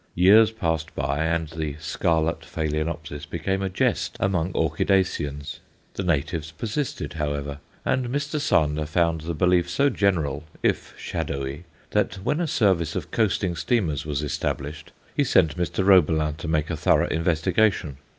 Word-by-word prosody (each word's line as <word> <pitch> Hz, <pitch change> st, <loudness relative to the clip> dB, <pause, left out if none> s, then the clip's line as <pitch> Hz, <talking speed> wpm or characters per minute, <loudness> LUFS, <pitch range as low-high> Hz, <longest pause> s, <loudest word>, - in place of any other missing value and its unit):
Years 105 Hz, +5 st, +7 dB
passed 80 Hz, -7 st, -2 dB
by 70 Hz, +3 st, 0 dB
and 80 Hz, -1 st, 0 dB
the 80 Hz, -2 st, -4 dB
scarlet 80 Hz, +1 st, 0 dB
Phaloenopsis 80 Hz, 0 st, -3 dB
became 90 Hz, +4 st, -2 dB
a 95 Hz, -, -1 dB
jest 90 Hz, -, 0 dB
among 90 Hz, -2 st, 0 dB
orchidaceans. 75 Hz, -6 st, 0 dB, 0.3 s
The -, -, -3 dB
natives 80 Hz, -2 st, -1 dB
persisted, 105 Hz, -, -3 dB
however, 75 Hz, -2 st, -3 dB, 0.3 s
and 130 Hz, -1 st, +1 dB
Mr. 145 Hz, +4 st, -2 dB
Sander 75 Hz, -, +1 dB
found 85 Hz, 0 st, +1 dB
the 85 Hz, +1 st, -4 dB
belief 90 Hz, +1 st, +3 dB
so 140 Hz, +9 st, +2 dB
general, 85 Hz, -, 0 dB, 0.2 s
if -, -, 0 dB
shadowy, 70 Hz, +4 st, -4 dB, 0.3 s
that -, -, +1 dB
when 150 Hz, +8 st, 0 dB
a 170 Hz, -, 0 dB
service 95 Hz, -, +2 dB
of -, -, -4 dB
coasting 95 Hz, -5 st, +1 dB
steamers 85 Hz, -, 0 dB
was 75 Hz, -1 st, -2 dB
established, 75 Hz, 0 st, -3 dB, 0.2 s
he -, -, +3 dB
sent 80 Hz, -, +3 dB
Mr. 90 Hz, +2 st, -1 dB
Roebelin 80 Hz, -5 st, +4 dB
to 85 Hz, -, -6 dB
make 80 Hz, 0 st, 0 dB
a -, -, -1 dB
thorough 75 Hz, -, +3 dB
investigation. 80 Hz, -1 st, +1 dB
80 Hz, 145 wpm, -24 LUFS, 75-95 Hz, 0.3 s, Years